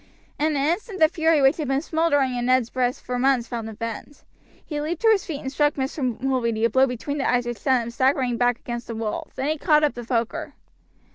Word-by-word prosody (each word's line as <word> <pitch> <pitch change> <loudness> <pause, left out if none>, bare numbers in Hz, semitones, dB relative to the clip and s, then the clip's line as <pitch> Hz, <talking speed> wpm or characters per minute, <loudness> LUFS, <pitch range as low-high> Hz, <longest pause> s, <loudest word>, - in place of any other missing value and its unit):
In 305 +1 +1
an 275 +1 +1
instant 385 +4 -2
the 315 - +7
fury 320 -2 +2
which 270 +3 +4
had 305 -4 -3
been 270 +1 +1
smoldering 290 -6 +1
in 245 0 -2
Ned's 255 -2 +2
breast 250 -1 -1
for 250 0 -3
months 260 -2 +2
found 230 -3 -5
a - - -8
vent. 230 +5 -7 0.4
He 295 -2 -4
leaped 325 +6 -4
to 450 - +6
his 405 -4 +1
feet 295 -4 -4
and 265 - -5
struck 295 +1 +1
Mr. 265 -3 -2
Mulready 235 -4 0
a 230 - +1
blow 265 +1 +4
between 275 +4 -4
the 270 - 0
eyes 245 -1 +1
which 240 -1 -4
sent 260 -3 +2
him 235 - -6
staggering 260 0 +1
back 245 0 +2
against 240 -1 -6
the 230 - -5
wall; 220 -1 -4
then 270 +3 -2
he 310 -1 -1
caught 305 -1 +3
up 295 - +2
the 240 - -7
poker. 230 -1 -2
265 Hz, 240 wpm, -24 LUFS, 240-295 Hz, 0.4 s, the